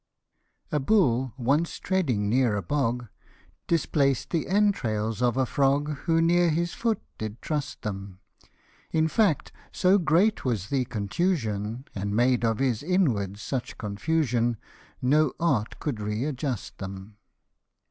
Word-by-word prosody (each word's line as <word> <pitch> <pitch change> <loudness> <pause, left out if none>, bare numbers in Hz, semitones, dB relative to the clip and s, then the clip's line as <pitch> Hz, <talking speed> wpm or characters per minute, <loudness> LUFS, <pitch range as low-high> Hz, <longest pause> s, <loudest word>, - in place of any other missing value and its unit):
A 150 - +1
BULL 135 - +2
once 140 +7 +1
treading 135 - 0
near 120 0 +2
a 100 - -2
bog, 125 -4 -1 0.6
Displaced 140 -5 +1
the 165 -3 0
entrails 120 - +1
of 125 0 +2
a 130 - +3
frog, 140 +3 +1 0.2
Who 165 -1 +3
near 175 +1 +4
his 170 +2 0
foot 230 -3 0 0.2
did 110 +1 -5
trust 150 -2 -4
them; 100 -3 -5 0.7
In 160 0 +2
fact, 180 - +1 0.2
so 190 +1 +4
great 180 +6 +2
was 110 -7 -1
the 135 -2 +1
contusion, 115 - -2
And 100 +1 -3
made 120 +1 +3
of 115 -2 +2
his 130 -5 0
inwards 115 - 0
such 130 -3 -4
confusion, 120 +1 0 0.5
No 145 +2 +3
art 130 -11 0
could 140 -8 -3
re 105 +4 -2
adjust 135 -5 -4
them. 95 +2 -8
130 Hz, 135 wpm, -26 LUFS, 110-160 Hz, 0.7 s, near